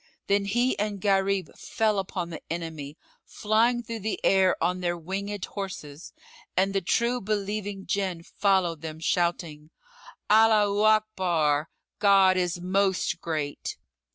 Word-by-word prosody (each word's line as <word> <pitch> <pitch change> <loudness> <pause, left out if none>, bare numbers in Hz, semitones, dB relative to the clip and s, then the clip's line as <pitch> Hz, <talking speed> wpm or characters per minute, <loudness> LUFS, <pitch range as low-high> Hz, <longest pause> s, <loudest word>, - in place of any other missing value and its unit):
Then 200 0 +1
he 240 +6 +1
and 205 -1 -2
Gharib 195 -3 0
fell 215 -2 0
upon 180 -2 -4
the 160 - -7
enemy, 160 -3 -5 0.3
flying 230 +3 +1
through 230 -1 -6
the 215 +1 -3
air 190 -1 +4
on 180 +1 0
their 175 -1 -1
winged 195 +4 -4
horses, 175 -6 -7 0.5
and 195 +1 +2
the 195 - +1
true 235 +6 0
believing 205 -1 -3
Jinn 185 -4 -2
followed 185 -5 +1
them, 160 -1 -7
shouting 165 -3 -1 0.6
"Allaho 210 -1 +4
Akbar—God 190 -1 +2
is 180 -1 -1
Most 190 -1 0
Great!" 155 -3 -4
195 Hz, 125 wpm, -26 LUFS, 170-205 Hz, 0.6 s, air